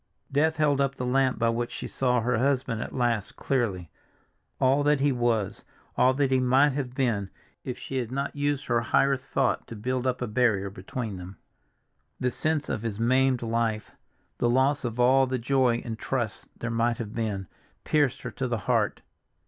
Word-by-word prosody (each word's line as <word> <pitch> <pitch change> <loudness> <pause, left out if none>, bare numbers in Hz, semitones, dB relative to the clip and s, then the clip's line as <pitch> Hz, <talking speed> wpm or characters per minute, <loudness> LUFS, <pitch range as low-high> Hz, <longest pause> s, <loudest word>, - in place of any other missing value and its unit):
Death 160 +3 +2
held 145 -3 +2
up 135 0 0
the 125 - -4
lamp 130 +1 +2
by 115 - +2
which 120 +1 -2
she - - -5
saw 125 -2 +1
her 120 0 +1
husband 130 -4 0
at - - -5
last 120 -5 -1
clearly—all 125 - -2
that 145 0 +3
he 140 +1 +3
was, 120 -5 0 0.3
all 125 +1 +5
that 140 -1 +1
he 130 - +4
might 130 +3 +4
have 130 -2 -4
been 110 -8 0 0.3
if 125 - -5
she 135 - -5
had 120 -2 -2
not 140 +2 -3
used 145 0 -1
her 120 -1 +1
higher 135 +3 +3
thought 125 - -1
to 115 - -8
build 130 +4 -2
up 125 -1 0
a 125 - -1
barrier 105 -4 +1
between 100 +2 -5
them. 90 +1 -9 0.8
The 125 - 0
sense 155 +1 -1
of 110 - -2
his 110 -2 -4
maimed 130 +1 +2
life, 115 -2 -1 0.5
the 120 - +2
loss 135 +4 +2
of 120 -1 -4
all 130 +2 +5
the 130 0 -1
joy 125 -1 +1
and 110 -2 -5
trust 120 -5 -3
there 120 - -4
might 115 0 +1
have 110 -2 -6
been, 105 -4 -2 0.4
pierced 145 -4 +1
her 125 - -4
to 130 +3 -3
the 120 -1 -1
heart. - - +1
125 Hz, 190 wpm, -27 LUFS, 115-135 Hz, 0.8 s, all